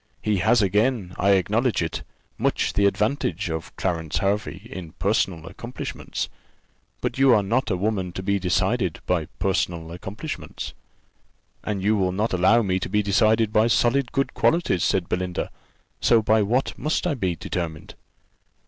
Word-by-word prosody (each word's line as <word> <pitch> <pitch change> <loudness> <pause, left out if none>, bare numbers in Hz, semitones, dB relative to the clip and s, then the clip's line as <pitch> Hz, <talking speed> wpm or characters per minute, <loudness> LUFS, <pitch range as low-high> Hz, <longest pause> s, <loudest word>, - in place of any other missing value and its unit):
He 105 -2 +1
has 110 +4 +4
again, 105 0 +1
I 100 +1 +4
acknowledge 105 +2 +1
it, 80 -1 -3 0.4
much - - +1
the 100 0 +4
advantage 100 - 0
of 80 -1 -5
Clarence 85 -4 -2
Hervey 100 -1 -1
in 90 -9 -8
personal 95 -5 0
accomplishments. - - -5 0.7
But - - -2
you 135 -2 +6
are 105 - +3
not 120 +7 0
a 95 - 0
woman 95 -2 -1
to 95 - -5
be 100 +1 +1
decided 90 -1 0
by - - +1
personal 85 -4 -1
accomplishments." 100 - -6 0.9
"And 100 -3 -3
you 105 +2 +3
will 95 -3 +1
not 105 +3 -1
allow 95 +6 +4
me 95 -2 0
to - - -4
be 105 +2 +1
decided 110 +2 +3
by 110 +1 +4
solid 120 +2 +2
good 135 - 0
qualities," 165 - +2
said 95 -3 +1
Belinda. 90 -1 -2 0.5
"So 115 -2 +4
by 110 +1 +4
what 120 +6 0
must 155 +6 0
I 175 - +1
be 95 -10 -1
determined?" 80 -3 -5
100 Hz, 155 wpm, -24 LUFS, 90-110 Hz, 0.9 s, you